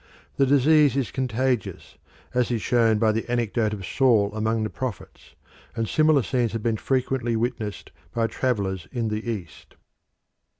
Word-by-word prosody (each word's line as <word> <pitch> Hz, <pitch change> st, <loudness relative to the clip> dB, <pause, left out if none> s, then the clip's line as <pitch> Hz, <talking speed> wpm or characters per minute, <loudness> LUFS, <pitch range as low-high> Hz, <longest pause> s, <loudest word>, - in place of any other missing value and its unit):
The 135 Hz, -, +3 dB
disease 145 Hz, +1 st, +4 dB
is 135 Hz, -4 st, -1 dB
contagious, 130 Hz, -2 st, -2 dB, 0.4 s
as 125 Hz, -1 st, +1 dB
is 120 Hz, -2 st, 0 dB
shown 115 Hz, -3 st, +3 dB
by 110 Hz, 0 st, +3 dB
the 115 Hz, +2 st, -3 dB
anecdote 115 Hz, -2 st, 0 dB
of 100 Hz, -3 st, -5 dB
Saul 110 Hz, -6 st, +2 dB
among 110 Hz, +1 st, 0 dB
the 110 Hz, -, -2 dB
prophets, 130 Hz, -7 st, -7 dB, 0.4 s
and 115 Hz, -1 st, -1 dB
similar 155 Hz, -1 st, +3 dB
scenes 120 Hz, +1 st, 0 dB
have 115 Hz, -2 st, -3 dB
been 115 Hz, -2 st, 0 dB
frequently 130 Hz, -1 st, -1 dB
witnessed 110 Hz, -3 st, -3 dB, 0.2 s
by 115 Hz, -1 st, 0 dB
travellers 100 Hz, -8 st, -2 dB
in 115 Hz, -3 st, -2 dB
the 105 Hz, +2 st, -3 dB
East. 90 Hz, -10 st, -7 dB
115 Hz, 155 wpm, -24 LUFS, 110-130 Hz, 0.4 s, disease